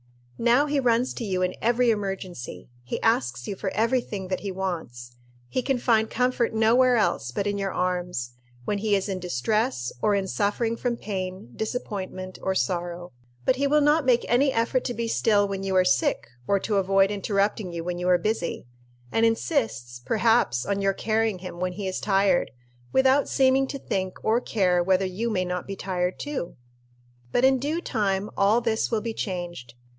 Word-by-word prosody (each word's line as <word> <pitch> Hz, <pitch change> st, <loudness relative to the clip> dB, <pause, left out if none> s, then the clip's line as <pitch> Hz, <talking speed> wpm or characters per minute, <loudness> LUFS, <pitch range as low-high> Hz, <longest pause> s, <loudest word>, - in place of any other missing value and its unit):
Now 240 Hz, +5 st, +4 dB
he 290 Hz, -1 st, 0 dB
runs 245 Hz, -1 st, +2 dB
to 240 Hz, -, -5 dB
you 185 Hz, -4 st, -1 dB
in 180 Hz, -, 0 dB
every 240 Hz, +1 st, +3 dB
emergency. 190 Hz, -, -5 dB
He 120 Hz, -, -4 dB
asks 130 Hz, -, +1 dB
you 200 Hz, -, -3 dB
for 190 Hz, -, -3 dB
every 230 Hz, +3 st, +2 dB
thing 195 Hz, -5 st, -6 dB
that 185 Hz, -, -1 dB
he 200 Hz, -, -4 dB
wants. 160 Hz, -11 st, -5 dB, 0.3 s
He 255 Hz, -, -1 dB
can 265 Hz, +1 st, 0 dB
find 225 Hz, -2 st, +2 dB
comfort 250 Hz, -1 st, 0 dB
nowhere 240 Hz, +3 st, +4 dB
else 200 Hz, -, +1 dB
but 160 Hz, +11 st, -2 dB
in 205 Hz, 0 st, -1 dB
your 195 Hz, -1 st, -1 dB
arms, 180 Hz, -9 st, -2 dB, 0.3 s
when 205 Hz, -, -1 dB
he 210 Hz, 0 st, +2 dB
is 195 Hz, 0 st, -1 dB
in 190 Hz, -2 st, -3 dB
distress 180 Hz, -, -1 dB
or 210 Hz, -1 st, +3 dB
in 195 Hz, -1 st, -1 dB
suffering 215 Hz, +4 st, 0 dB
from 240 Hz, 0 st, -2 dB
pain, 185 Hz, -, -5 dB
disappointment, 190 Hz, -5 st, -5 dB
or 190 Hz, -, -1 dB
sorrow. 175 Hz, -1 st, -2 dB, 0.3 s
But 255 Hz, -, +3 dB
he 280 Hz, +1 st, +1 dB
will 300 Hz, +1 st, +4 dB
not 295 Hz, +2 st, +4 dB
make 250 Hz, -2 st, +3 dB
any 265 Hz, +3 st, +3 dB
effort 240 Hz, +2 st, +1 dB
to 245 Hz, -, -2 dB
be 235 Hz, 0 st, -2 dB
still 210 Hz, -3 st, +2 dB
when 195 Hz, -1 st, -4 dB
you 195 Hz, -1 st, -2 dB
are 185 Hz, 0 st, +5 dB
sick, 135 Hz, -5 st, +2 dB, 0.2 s
or 200 Hz, -, +3 dB
to 210 Hz, -2 st, 0 dB
avoid 195 Hz, +1 st, +3 dB
interrupting 200 Hz, -1 st, 0 dB
you 170 Hz, -1 st, -4 dB
when 175 Hz, 0 st, -3 dB
you 180 Hz, +1 st, 0 dB
are 180 Hz, -, +6 dB
busy; 175 Hz, -, -2 dB, 0.5 s
and 225 Hz, -, +1 dB
insists, 225 Hz, -, 0 dB
perhaps, 220 Hz, -, +2 dB
on 200 Hz, 0 st, -1 dB
your 195 Hz, 0 st, +2 dB
carrying 220 Hz, 0 st, 0 dB
him 180 Hz, -1 st, -8 dB
when 180 Hz, 0 st, -1 dB
he 200 Hz, 0 st, -4 dB
is 185 Hz, -, -2 dB
tired, 195 Hz, -3 st, +2 dB, 0.4 s
without 265 Hz, +2 st, +3 dB
seeming 265 Hz, 0 st, +3 dB
to 275 Hz, -, -5 dB
think 190 Hz, -7 st, -3 dB
or 225 Hz, +3 st, +3 dB
care 185 Hz, -7 st, +2 dB
whether 190 Hz, +1 st, +2 dB
you 195 Hz, +6 st, -2 dB
may 185 Hz, -4 st, 0 dB
not 180 Hz, 0 st, -4 dB
be 195 Hz, -, -4 dB
tired 180 Hz, -1 st, -2 dB
too. 290 Hz, -12 st, -4 dB, 0.8 s
But 245 Hz, -, +3 dB
in 265 Hz, -1 st, +4 dB
due 300 Hz, +6 st, -1 dB
time 205 Hz, -, -1 dB
all 205 Hz, +4 st, +4 dB
this 225 Hz, -2 st, 0 dB
will 225 Hz, -2 st, 0 dB
be 230 Hz, 0 st, -3 dB
changed. 175 Hz, -, -5 dB
200 Hz, 190 wpm, -25 LUFS, 185-230 Hz, 0.8 s, are